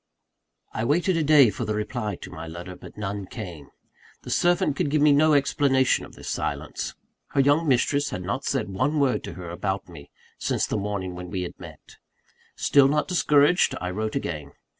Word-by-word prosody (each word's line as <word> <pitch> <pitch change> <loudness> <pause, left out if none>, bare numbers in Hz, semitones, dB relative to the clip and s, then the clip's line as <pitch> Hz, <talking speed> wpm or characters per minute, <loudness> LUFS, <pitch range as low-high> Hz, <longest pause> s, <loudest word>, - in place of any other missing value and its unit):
I 110 - -2
waited 170 - +2
a 165 - +1
day 145 -6 +6
for - - -5
the 110 - -2
reply 105 -1 -3
to - - -9
my 80 +1 -7
letter; 85 +3 -8
but - - -13
none 100 -1 -4
came. 90 - -8 0.6
The - - -7
servant 175 -5 +2
could 145 - 0
give 150 +2 +2
me 150 - +6
no 150 +2 +5
explanation 135 -2 +2
of - - -15
this - - -11
silence. - - -3 0.4
Her 140 - +1
young 145 +4 +3
mistress 140 +2 +2
had 90 - -5
not 100 +9 -3
said 135 - -1
one 145 +11 0
word 135 -3 +1
to - - -7
her 85 -2 -7
about 95 +2 -3
me, 85 -5 -12 0.3
since - - 0
the - - -3
morning 100 -3 -3
when 90 0 -8
we 90 0 -3
had 90 - -6
met. - - -13 0.6
Still 140 -2 +4
not 150 +2 +1
discouraged, 150 -1 +3
I 90 0 -3
wrote 110 +4 -3
again. 75 - -4
115 Hz, 195 wpm, -25 LUFS, 90-145 Hz, 0.6 s, day